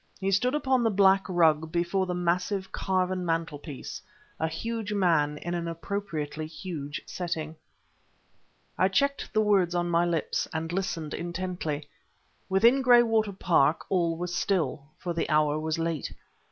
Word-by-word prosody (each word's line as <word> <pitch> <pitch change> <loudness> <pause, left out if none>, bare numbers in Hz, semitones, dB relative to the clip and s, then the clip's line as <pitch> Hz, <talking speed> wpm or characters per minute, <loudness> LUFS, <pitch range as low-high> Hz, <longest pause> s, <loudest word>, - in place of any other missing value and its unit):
He 195 -1 0
stood 250 +8 +2
upon 265 -4 +2
the 230 - +3
black 195 -1 +4
rug 160 -3 +3
before 175 +3 0
the 180 - -2
massive, 180 +2 -1
carven 185 -1 0
mantelpiece, 165 -4 -4 0.4
a 160 - +1
huge 220 +6 -4
man 165 -7 +2
in 175 +3 -4
an 170 -1 -2
appropriately 165 -4 -4
huge 155 -3 -6
setting. 160 -3 -4 1.2
I 185 - +5
checked 280 +9 0
the 215 - +2
words 195 -5 +3
on 175 0 0
my 170 +1 +3
lips, 165 -3 -1
and 160 +1 -3
listened 170 -5 -2
intently. 170 -4 -4 0.6
Within 235 +8 +5
Graywater 235 -4 +4
Park 165 -5 +2
all 170 -3 +1
was 175 +1 -4
still, 170 -8 -1
for 175 - -4
the 165 - -2
hour 150 -1 +2
was 160 +1 -2
late. 165 -2 -2
175 Hz, 145 wpm, -28 LUFS, 160-195 Hz, 1.2 s, I